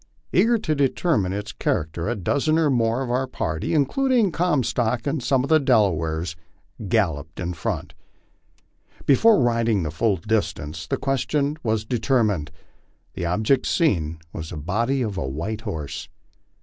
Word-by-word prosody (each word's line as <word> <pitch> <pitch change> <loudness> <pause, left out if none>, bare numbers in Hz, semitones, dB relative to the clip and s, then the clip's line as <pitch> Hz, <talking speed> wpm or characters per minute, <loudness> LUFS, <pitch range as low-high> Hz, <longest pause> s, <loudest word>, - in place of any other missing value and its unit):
Eager 235 +1 +4
to 185 -8 -1
de 140 -2 +3
termine 115 - 0
its 105 +2 -4
character, 85 0 -2
a 120 - 0
dozen 145 - +1
or 155 -3 +3
more 120 +1 +1
of 120 - -4
our 130 +2 0
party, 80 - -2
including 235 - +2
Comstock 125 -9 0
and 145 0 -1
some 130 +1 +2
of 140 - -4
the 160 - +6
Delawares, 85 - +1 0.5
galloped 80 -8 0
in 90 0 -2
front. 80 - -4 1.1
Before 215 - +5
riding 115 -5 +2
the 75 - -3
full 105 +3 +1
distance 80 -6 -2
the - - -1
question 140 +2 0
was 110 -3 -1
determined. 110 - +1 0.6
The 85 - -3
object 110 +9 +1
seen 85 - +1 0.2
was 80 0 -6
the 85 - -6
body 115 - 0
of 105 -4 -3
a 65 - -2
white 100 +11 -4
horse. 80 -10 -5
115 Hz, 150 wpm, -23 LUFS, 85-135 Hz, 1.1 s, the